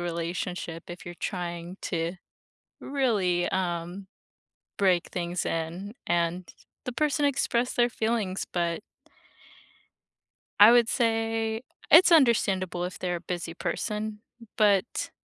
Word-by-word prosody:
relationship, 170 0 -4
if 175 0 -9
you're 175 - -7
trying 175 -1 -4
to 170 0 -2 0.7
really, 210 -11 +1
um, 180 +1 -3 0.7
break 185 -3 +2
things 175 0 -3
in 170 +5 -3
and 170 +1 0 0.4
the 250 - -2
person 295 +1 +1
expressed 250 -3 0
their 240 0 +4
feelings, 220 -5 -1
but 170 +1 -1 1.8
I 210 +3 +11
would 240 -1 +5
say 225 -1 0 0.3
it's 340 +3 +8
understandable 195 - +3
if 180 - -5
they're 180 -1 -2
a - - -7
busy 175 -2 -5
person, 210 +3 -3 0.4
but 205 0 +2
185 Hz, 110 wpm, -27 LUFS, 175-225 Hz, 1.8 s, I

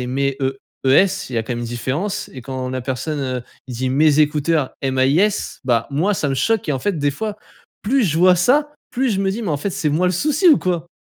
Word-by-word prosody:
et 125 - -3
mes 135 +1 -1
E 135 0 -1 0.3
E - - +4
S, 180 -1 +3
il - - -5
y - - +1
a - - 0
quand 120 - -4
même 120 - -4
une - - -3
différence 135 - -3
et 130 -3 -9
quand 130 0 -5
la 130 0 -3
personne 140 +4 -3
heu, 130 -2 -3 0.3
il 125 - -6
dit: 130 +2 -1
«mes 150 +2 +3
écouteurs: 150 -1 +1
M 130 -1 -1
A 130 - +4
I 145 +4 +3
S», 210 0 -1
bah, 115 -2 +1
moi 170 +9 +1
ça 145 -6 -1
me - - 0
choque 220 - 0
et - - +2
en 135 - -1
fait 200 -6 -1
des 145 0 +1
fois, 210 +8 -4 0.5
plus 260 +5 +2
je 160 -4 0
vois 180 +1 +6
ça, 290 - +2 0.2
plus 260 0 0
je 195 -1 0
me 195 -1 +1
dis: 225 +4 -4
«Mais 200 - -3
en 150 - +1
fait 200 +7 -3
c'est 155 -3 -1
moi 170 +5 +1
le 180 - +2
souci 305 - +2
ou 300 - +7
quoi?» 175 -2 -2
150 Hz, 285 wpm, -20 LUFS, 130-195 Hz, 0.5 s, ou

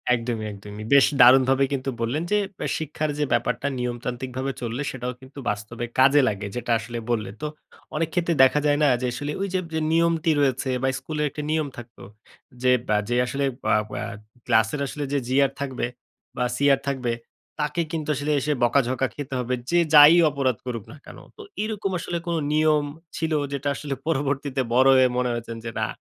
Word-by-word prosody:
একদমই, 115 -2 -3
একদমই। 105 +1 -9
বেশ 140 -1 +7 0.2
দারুণভাবেই 130 +2 +6
কিন্তু 135 0 -2
বললেন 130 +8 -1
যে, 210 - +4 0.2
ব্যা - - -3
শিক্ষার 155 0 -3
যে 150 - +2
ব্যাপারটা 125 +3 0
নিয়মতান্ত্রিকভাবে 125 +2 -3
চললে, 120 +3 -3
সেটাও 125 -1 -4
কিন্তু 135 +2 -12
বাস্তবে 105 +3 -4
কাজে 140 +2 +6
লাগে। 105 0 -2
যেটা 120 -1 -3
আসলে 115 +2 -6
বললেন। 105 -3 -2
তো 150 - 0 0.5
অনেক 160 +1 0
ক্ষেত্রে 175 -1 +1
দেখা 130 +3 +4
যায় 145 -1 +3
না - - +5
যে, 125 - 0
আসলে 145 +3 -4
ঐযে 190 -1 -1
বে 165 - -13
যে - - +1
নিয়মটি 165 -1 +2
রয়েছে 135 -1 +1
বা, - - +3
স্কুলের 150 +2 -3
একটা 150 - -6
নিয়ম 155 -1 0
থাকতো। 120 0 -11 0.6
যে 125 - +5 0.2
বা, 105 0 +2
যে 120 - +1
আসলে 140 +3 -1 0.2
বা - - +3 0.2
বা - - -4 0.4
ক্লাসের 110 +4 +2
আসলে 145 +2 -5
যে 140 - +2
GR 135 +1 +3
থাকবে 130 -3 -2 0.5
বা, - - +1
CR 140 0 +3
থাকবে, 125 -3 -1 0.5
তাকে 150 +3 0
কিন্তু 155 -2 -3
আসলে 145 +3 -2
এসে 150 +3 0
বকাঝকা 130 +1 +2
খেতে 140 -2 -6
হবে। 125 +1 -2 0.2
যে 175 - +4
যাই 150 +2 +10
অপরাধ 135 -5 0
করুক 115 -4 -4
না 145 - -11
কেন। - - -11 0.2
তো 440 - -10 0.2
এরকম 210 -3 -3
আসলে 170 0 -3
কোন 170 - -1 0.2
নিয়ম 155 -1 +3 0.3
ছিল 160 0 -2 0.2
যেটা 140 +1 -3
আসলে 145 -2 -4
পরবর্তীতে 140 -3 -1
বড় 130 +2 +5
হয়ে 130 -1 +6
মনে 125 0 +1
হয়েছে 120 0 -5
যে 115 - -3
না, - - 0
135 Hz, 185 wpm, -24 LUFS, 120-150 Hz, 0.6 s, যাই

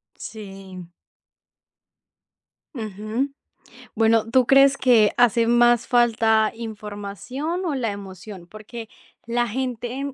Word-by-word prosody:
Sí. 195 -4 -10 1.9
Ujú. 220 +3 -4 0.7
Bueno, 225 0 +2
¿tú 255 -1 +4
crees 275 0 +5
que 230 -5 +4
hace 235 -1 +4
más 240 0 +3
falta 225 -2 +3
información 225 - -6
o 310 - -1
la 235 -5 -1
emoción? 195 -2 -10
Porque 215 +3 -10 0.4
la 240 +1 0
gente, 255 +3 -4
230 Hz, 95 wpm, -22 LUFS, 210-245 Hz, 1.9 s, crees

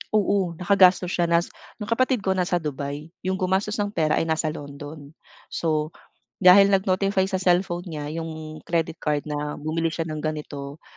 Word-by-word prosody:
Oo, 195 -4 +1
nakagastos 185 0 +4
siya 175 -1 +1
nas 170 +1 +1 0.3
'yong 210 - -7
kapatid 255 -2 +2
ko 190 - +1
nasa 180 -1 0
Dubai. 145 +2 -5 0.2
Yung 190 - +1
gumastos 190 +3 0
ng 205 -1 -1
pera 155 -5 +1
ay - - +1
nasa 160 -1 0
London. 145 0 -8 0.4
So, 155 -1 -1 0.5
dahil 195 +2 +8
nag-notify 190 0 +1
sa 190 - 0
cellphone 180 0 +1
niya 150 -3 -5
yung 155 -1 -6
credit 165 -1 -1
card 150 -1 -1
na 150 0 -3
bumili 160 +2 -2
siya 165 0 -3
ng 155 - -4
ganito, 150 -2 -5
165 Hz, 165 wpm, -24 LUFS, 155-190 Hz, 0.5 s, dahil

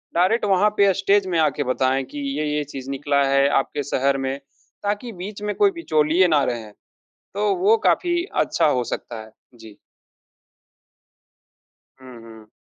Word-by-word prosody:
Direct 185 +7 +2
वहाँ 200 +1 +3
पे 200 -1 +4
stage 195 +1 +1
में - - +2
आ 155 -1 +4
के 145 - 0
बताएँ 130 +1 0
कि 145 - -5 0.2
ये-ये 150 0 -1
चीज़ 135 -1 -7
निकला 140 +1 0
है 140 0 +3
आपके 145 +1 -4
शहर 135 +1 +1
में। 135 +1 -3 0.4
ताकि 205 +4 -3
बीच 205 +1 -8
में 210 0 -2
कोई 405 -1 +3
बिचौलिये 170 - +2
ना 150 -4 +3
रहें, 115 -4 -4 0.6
तो 205 0 0
वो 200 +5 +3
काफ़ी 345 -1 +1
अच्छा - - +1
हो 125 -4 +1
सकता 115 -2 -6
है। 110 - -16 0.2
जी। 110 -3 -14 2.2
हुँ, 125 -3 -12
हुँ। 110 -1 -14
150 Hz, 155 wpm, -22 LUFS, 135-200 Hz, 2.2 s, पे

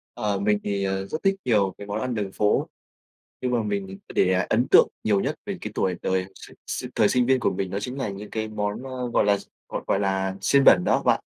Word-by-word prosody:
Ờ, 100 -2 -1
mình 105 +1 +2
thì, 100 -1 -1
ờ, 95 0 -1
rất 155 - -5
thích 195 0 +3
nhiều 100 -6 +2
cái 100 - -9
món 105 +1 -3
ăn 125 -2 -2
đường 100 -3 -3
phố, 105 +1 +1 0.7
nhưng 125 - -1
mà 120 -2 +2
mình 100 -2 -3 0.2
để 95 0 +2
ấn 120 +3 +2
tượng - - +7 0.2
nhiều 100 -2 +3
nhất 140 +7 -1
về 200 -2 -4
cái 105 - -5
tuổi 95 -1 0
đời 95 0 0
s - - -13 0.2
s - - -4
thời - - +4
sinh 125 -1 +2
viên 130 0 +3
của - - +2
mình 95 0 -3
đó 100 - -2
chính 125 +5 -5
là 130 - -2
những 100 +1 -7
cái 110 -1 -3
món, 105 +1 -3
ơ, 130 -2 -4
gọi - - +3
là, 100 0 +4
d - - -13 0.2
gọi - - -4
gọi 100 - +1
là 95 -1 0
xiên 140 -1 +3
bẩn 90 - +7
đó - - +2
bạn. - - +3
105 Hz, 255 wpm, -25 LUFS, 95-125 Hz, 0.7 s, tượng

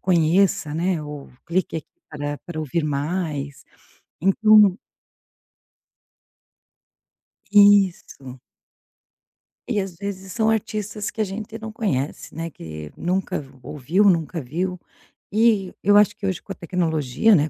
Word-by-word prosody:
"Conheça", 170 -2 +2
né, 175 0 0
ou: 150 -2 -8 0.2
"Clique 175 0 -1
aqui 160 - -6 0.2
para 145 -1 -4
para 175 -2 -7
ouvir 155 +2 -1
mais". 145 -1 -3 0.6
Então 205 +1 +5 2.8
Isso. 195 -10 +4 1.3
E, 205 - 0
às 190 -3 -5
vezes, 195 0 -6
são 220 -1 +2
artistas 215 -1 -2
que - - -8
a - - +2
gente 215 +3 -6
não 220 -1 -7
conhece, 145 - -3
né, 165 +1 -4
que 75 - -9
nunca 180 0 -1
v 135 - -12
ouviu, 155 +10 0
nunca 170 -3 +2
viu. 180 +8 -3 0.6
E 215 -4 +3
eu 205 +2 +6
acho 205 0 +4
que 210 - -7
hoje 190 -2 -1
com - - -7
a - - -16
tecnologia, 170 - +2
né, 155 0 +2
180 Hz, 125 wpm, -23 LUFS, 150-205 Hz, 2.8 s, eu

